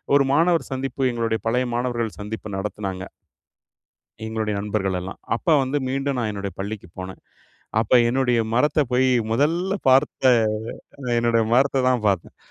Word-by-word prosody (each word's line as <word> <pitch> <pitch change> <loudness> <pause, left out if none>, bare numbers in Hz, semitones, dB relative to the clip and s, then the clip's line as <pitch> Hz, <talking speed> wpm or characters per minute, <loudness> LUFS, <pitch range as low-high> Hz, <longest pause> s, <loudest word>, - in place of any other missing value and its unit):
ஒரு 140 -1 +4
மாணவர் 165 +3 +2
சந்திப்பு, 135 +1 -4
எங்களுடைய 115 -2 -1
பழைய 125 +2 +1
மாணவர்கள் 120 -3 -2
சந்திப்பு 110 +1 -6
நடத்துனாங்க 95 -1 -4 1.2
எங்களுடைய 110 -1 -2
நண்பர்கள் 100 -2 -1
எல்லாம். 95 +2 -8 0.2
அப்ப 120 - -9 0.2
வந்து, 135 +2 -1
மீண்டும் 135 0 -1
நான் 115 -3 -1
என்னுடைய 100 -1 -5
பள்ளிக்கு 100 -1 -5
போனேன். 95 0 -7 0.6
அப்போ 115 +3 +3
என்னுடைய 125 -1 +2 0.2
மரத்த 150 +4 +3
போயி 130 +1 +3 0.2
முதல்ல 170 +10 +1
பார்த்த, 130 0 +4 0.9
என்னுடைய 115 -1 +2
மரத்த 135 +1 +3
தான் 125 -4 +1
பாத்தேன். 95 -4 -1
120 Hz, 135 wpm, -23 LUFS, 105-135 Hz, 1.2 s, ஒரு